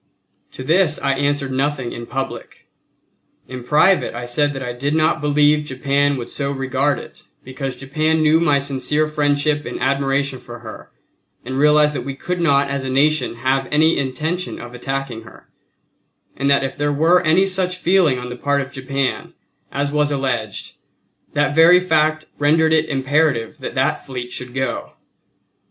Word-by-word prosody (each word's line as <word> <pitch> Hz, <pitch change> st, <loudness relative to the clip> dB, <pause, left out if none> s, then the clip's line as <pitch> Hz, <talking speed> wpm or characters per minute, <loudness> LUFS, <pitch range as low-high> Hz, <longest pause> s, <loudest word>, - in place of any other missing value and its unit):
To 130 Hz, -, -7 dB
this 160 Hz, +2 st, +2 dB
I 140 Hz, -, +1 dB
answered 140 Hz, 0 st, -1 dB
nothing 135 Hz, -2 st, -1 dB
in 120 Hz, 0 st, -7 dB
public. 135 Hz, -1 st, -6 dB, 0.8 s
In 130 Hz, -1 st, -8 dB
private 155 Hz, +4 st, +3 dB
I 120 Hz, 0 st, -5 dB
said 145 Hz, +4 st, +1 dB
that 135 Hz, -1 st, -5 dB
I 125 Hz, -1 st, -4 dB
did 140 Hz, +5 st, -2 dB
not 155 Hz, -2 st, +2 dB
believe 150 Hz, +1 st, +3 dB
Japan 140 Hz, +1 st, 0 dB
would 120 Hz, -, -6 dB
so 140 Hz, -1 st, -2 dB
regard 135 Hz, +1 st, 0 dB
it -, -, -11 dB, 0.2 s
because 130 Hz, 0 st, -5 dB
Japan 155 Hz, +4 st, 0 dB
knew 155 Hz, +1 st, +4 dB
my 150 Hz, -4 st, +3 dB
sincere 140 Hz, +2 st, 0 dB
friendship 150 Hz, 0 st, 0 dB
and -, -, -6 dB
admiration 135 Hz, 0 st, 0 dB
for 120 Hz, 0 st, -10 dB
her 110 Hz, -2 st, -10 dB, 0.6 s
and 130 Hz, +2 st, -3 dB
realized 150 Hz, 0 st, +4 dB
that 140 Hz, -, -3 dB
we 135 Hz, +2 st, -6 dB
could 180 Hz, +5 st, -4 dB
not 140 Hz, -4 st, +3 dB
as 140 Hz, -1 st, -3 dB
a 130 Hz, -, -4 dB
Nation 150 Hz, +1 st, +1 dB
have 130 Hz, +2 st, 0 dB
any 160 Hz, +2 st, +4 dB
intention 155 Hz, +7 st, -3 dB
of 120 Hz, 0 st, -9 dB
attacking 135 Hz, -2 st, -4 dB
her; 110 Hz, -, -16 dB, 0.9 s
and 140 Hz, +1 st, -1 dB
that 140 Hz, -1 st, +4 dB
if 135 Hz, -, -3 dB
there 145 Hz, 0 st, 0 dB
were 165 Hz, +5 st, +3 dB
any 175 Hz, +3 st, +3 dB
such 185 Hz, -1 st, -1 dB
feeling 180 Hz, -7 st, +3 dB
on 125 Hz, 0 st, -6 dB
the 125 Hz, -, -6 dB
part 140 Hz, +2 st, 0 dB
of 135 Hz, 0 st, -7 dB
Japan 135 Hz, 0 st, -3 dB, 0.4 s
as 140 Hz, +1 st, -2 dB
was 150 Hz, 0 st, +1 dB
alleged 125 Hz, -7 st, -3 dB, 0.6 s
that 145 Hz, 0 st, +1 dB
very 165 Hz, +3 st, +7 dB
fact 155 Hz, -3 st, +1 dB
rendered 160 Hz, +2 st, +3 dB
it 160 Hz, 0 st, +2 dB
imperative 140 Hz, -1 st, 0 dB
that 130 Hz, -, -6 dB
that 130 Hz, +1 st, 0 dB
fleet 125 Hz, -2 st, -6 dB
should 125 Hz, 0 st, -6 dB
go. 130 Hz, -2 st, -3 dB
140 Hz, 170 wpm, -19 LUFS, 130-155 Hz, 0.9 s, very